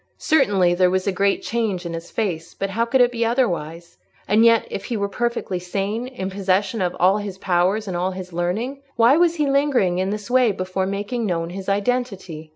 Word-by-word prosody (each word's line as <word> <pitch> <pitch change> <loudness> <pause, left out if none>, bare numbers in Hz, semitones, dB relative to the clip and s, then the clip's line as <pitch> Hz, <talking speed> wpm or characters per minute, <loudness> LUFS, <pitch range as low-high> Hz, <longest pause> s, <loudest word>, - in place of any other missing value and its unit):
Certainly, 205 - +3
there 180 +1 +3
was 185 0 0
a 200 - +1
great 195 +1 +1
change 215 -6 -2
in 170 - -4
his 165 +1 -7
face; 175 -7 -3
but 195 0 -3
how 230 +4 0
could 250 +2 +2
it 245 0 +4
be 235 -1 -1
otherwise? 175 - -2 0.3
And 215 +3 +4
yet, 230 -1 +5
if 195 - -5
he 235 - -3
were 200 -1 -1
perfectly 235 -3 -2
sane—in 200 +4 -3
possession 195 +2 0
of 180 -1 -1
all 190 +4 +4
his 200 -2 -6
powers 190 +4 +1
and 185 - -3
all 180 +2 0
his 185 -1 -8
learning, 215 +11 -2
why 235 +3 +5
was 340 0 +3
he 300 -3 +1
lingering 275 -11 +2
in 190 +1 0
this 210 +3 -5
way 250 -4 +4
before 185 0 -2
making 205 +4 -3
known 170 -2 -2
his 190 +1 -6
identity? 195 -7 -2
195 Hz, 205 wpm, -22 LUFS, 185-235 Hz, 0.3 s, yet